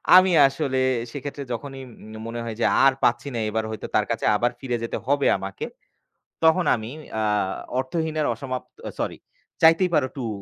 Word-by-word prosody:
আমি 185 0 +7 0.2
আসলে 135 -1 -1 0.3
সেক্ষেত্রে 145 +1 -6
যখনই 135 +2 -6
উম 110 -2 -13
মনে 115 +1 -5
হয় 115 -1 -5
যে, - - +2 0.2
আর 135 - +6
পাচ্ছি 120 +4 +2
না - - -1
এবার 110 +1 -1
হয়তো 110 -2 -5
তার - - +3
কাছে - - -2
আবার 120 +3 +1
ফিরে 125 -2 -2
যেতে 115 - -3
হবে 140 +1 +2
আমাকে। 95 0 -5 0.8
তখন 160 +3 +5
আমি 110 0 -7 0.2
অ্যা 110 0 0 0.5
অর্থহীন 160 +4 -2
এর 150 - +1
অসমাপ্ত 130 -2 -6 0.3
sorry - - -2 0.4
'চাইতেই 165 +3 +5
পারো 130 - +3
টু' 130 -4 -3
130 Hz, 175 wpm, -24 LUFS, 115-145 Hz, 0.8 s, আমি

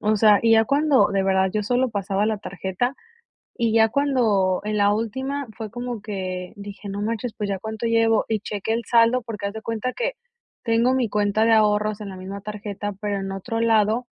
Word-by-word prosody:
O 215 0 +2
sea, 210 -1 +5
y 230 - +3
ya 225 0 +6
cuando, 285 +1 +3
de 195 -1 0
verdad, 190 0 +2
yo 210 -1 0
solo 250 +4 +1
pasaba 200 0 -1
la 220 -1 0
tarjeta, 195 +6 -3 0.6
y 230 -2 0
ya 220 -1 +5
cuando 225 -9 +2
en 210 0 -1
la 205 0 +4
última 265 +6 -3
fue 220 -2 -5
como 240 0 -5
que 185 -3 -5
dije: 205 0 -9
"No 200 +1 -4
manches, 230 +1 -3
pues, 205 -1 -3
¿ya 195 - -1
cuánto 220 +3 -6
llevo?", 225 -1 +3
y 220 -2 0
cheque 210 +1 -3
el 230 0 -1
saldo, 235 +1 +4
porque 220 -3 -7
haz 200 - -3
de 220 - -5
cuenta 230 +2 -3
que - - -2 0.5
tengo 230 +2 +3
mi 255 -4 +1
cuenta 210 +1 +1
de 230 - +4
ahorros 210 -1 +2
en 200 - -6
la 190 - -8
misma 195 +2 -7
tarjeta, 205 -1 -5
pero 205 -1 -2
en 195 0 -4
otro 225 +4 -4
lado 225 +1 +2
215 Hz, 210 wpm, -23 LUFS, 200-230 Hz, 0.6 s, ya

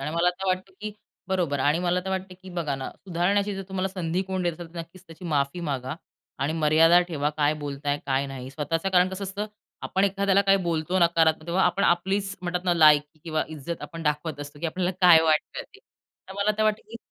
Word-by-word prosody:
आणि 145 +2 -3
मला 175 +1 +3
तर 190 +2 -7
वाटतं 185 +1 -1
की 215 0 -5 0.4
बरोबर. 170 -7 0
आणि 145 +4 +2
मला 180 0 +1
तर 190 - -3
वाटतं 190 -1 -3
की 190 - -10
बघा 165 -5 -2
ना, 135 - -5
सुधारण्याची 195 +3 0
जर 195 - -5
तुम्हाला 190 0 -1
संधी 180 -1 -2
कोण 190 -1 -3
देत 175 -1 +1
असेल, 165 +1 -9
तर - - -6
नक्कीच 170 +3 -9
त्याची 165 +2 -13
माफी 145 +1 0
मागा. 130 +1 -3 0.4
आणि 140 +4 0
मर्यादा 160 +2 +5
ठेवा. 150 -2 -1
काय 150 0 +2
बोलताय? 145 0 -2
काय 135 +1 +1
नाही? 130 -1 -7
स्वतःच 160 +3 -2
कारण 180 0 +5
कसं 190 +1 -5
असतं? 200 +2 -4 0.4
आपण 190 +1 +1
एखाद्याला 200 0 +2
काही 195 0 +4
बोलतो 170 +2 0
नकारात्मक 165 -2 +3
तेव्हा 180 +3 +1
आपण 180 +3 +2
आपलीच 195 +3 +1
म्हणतात 180 +1 -2
ना, 175 -1 +2
लायकी 150 -1 +5
किंवा 155 -1 0
इज्जत 160 +2 -6
आपण 165 0 -7
दाखवत 150 0 -2
असतो, 145 0 -9
की 170 - -1
आपल्याला 180 +2 -1
काय 175 -3 +8
वाटतं 155 -1 +1
ते. 405 - -19 0.5
तर 190 - -7
मला 200 +1 +2
तर - - +3
वाटतं 215 0 +1
की 230 - -7
170 Hz, 215 wpm, -26 LUFS, 155-190 Hz, 0.5 s, काय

